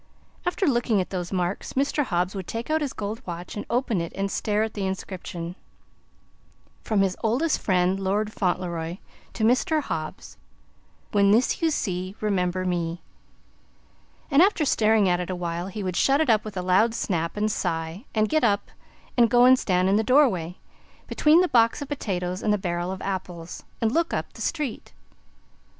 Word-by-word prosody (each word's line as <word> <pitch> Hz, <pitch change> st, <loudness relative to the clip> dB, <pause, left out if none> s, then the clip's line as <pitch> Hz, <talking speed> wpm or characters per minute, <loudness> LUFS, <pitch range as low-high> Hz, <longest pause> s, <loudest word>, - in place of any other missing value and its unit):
After 360 Hz, +2 st, 0 dB
looking 240 Hz, -, +2 dB
at 185 Hz, -, -3 dB
those 180 Hz, -2 st, -4 dB
marks, 180 Hz, 0 st, -2 dB
Mr. 280 Hz, +2 st, +1 dB
Hobbs 180 Hz, -3 st, 0 dB
would 190 Hz, -3 st, -6 dB
take 230 Hz, +6 st, -4 dB
out 315 Hz, 0 st, +2 dB
his 285 Hz, -3 st, -1 dB
gold 215 Hz, +3 st, -5 dB
watch 175 Hz, 0 st, -6 dB
and 205 Hz, -, -5 dB
open 235 Hz, -6 st, 0 dB
it 170 Hz, -, -5 dB
and 195 Hz, 0 st, -2 dB
stare 210 Hz, 0 st, 0 dB
at 220 Hz, -, -3 dB
the 195 Hz, -2 st, -2 dB
inscription: 180 Hz, -2 st, -5 dB, 1.3 s
"From 215 Hz, -3 st, +1 dB
his 190 Hz, -2 st, +1 dB
oldest 255 Hz, +9 st, +1 dB
friend, 185 Hz, 0 st, +1 dB
Lord 205 Hz, +3 st, -1 dB
Fauntleroy, 175 Hz, -2 st, -2 dB, 0.4 s
to 220 Hz, -, -3 dB
Mr. 255 Hz, +7 st, +3 dB
Hobbs. 160 Hz, -, -5 dB, 0.7 s
When 200 Hz, -1 st, +4 dB
this 230 Hz, +5 st, +3 dB
you 330 Hz, -, +3 dB
see, 185 Hz, -, -2 dB
remember 185 Hz, -3 st, 0 dB
me." 175 Hz, -1 st, -2 dB, 1.3 s
And 280 Hz, +3 st, +6 dB
after 370 Hz, -5 st, +3 dB
staring 220 Hz, -5 st, +3 dB
at 175 Hz, -1 st, +2 dB
it 180 Hz, -, -4 dB
awhile, 175 Hz, -1 st, -3 dB
he 200 Hz, +1 st, -5 dB
would 185 Hz, -2 st, -3 dB
shut 275 Hz, +7 st, +3 dB
it 315 Hz, -6 st, +3 dB
up 215 Hz, -1 st, +3 dB
with 210 Hz, -3 st, -7 dB
a 180 Hz, -, -2 dB
loud 205 Hz, +6 st, +3 dB
snap, 170 Hz, -5 st, -2 dB
and 215 Hz, +1 st, +1 dB
sigh 165 Hz, +5 st, -3 dB
and 215 Hz, 0 st, +3 dB
get 310 Hz, +5 st, +1 dB
up 205 Hz, -3 st, +1 dB, 0.4 s
and 235 Hz, -2 st, +5 dB
go 245 Hz, +1 st, +6 dB
and 255 Hz, 0 st, +7 dB
stand 180 Hz, -1 st, +1 dB
in 195 Hz, +2 st, +3 dB
the 220 Hz, -, +2 dB
door 275 Hz, +5 st, +5 dB
way 180 Hz, -5 st, -4 dB, 0.5 s
between 310 Hz, +3 st, +4 dB
the 365 Hz, -, +2 dB
box 230 Hz, -6 st, +3 dB
of 285 Hz, -, -6 dB
potatoes 185 Hz, -9 st, -3 dB
and 215 Hz, -, +1 dB
the 210 Hz, -, +3 dB
barrel 175 Hz, -1 st, -2 dB
of 190 Hz, -, -6 dB
apples 180 Hz, -3 st, -5 dB, 0.2 s
and 225 Hz, -1 st, +1 dB
look 335 Hz, +5 st, +1 dB
up -, -, -4 dB
the -, -, -11 dB
street. 300 Hz, -8 st, -3 dB
200 Hz, 185 wpm, -25 LUFS, 180-235 Hz, 1.3 s, and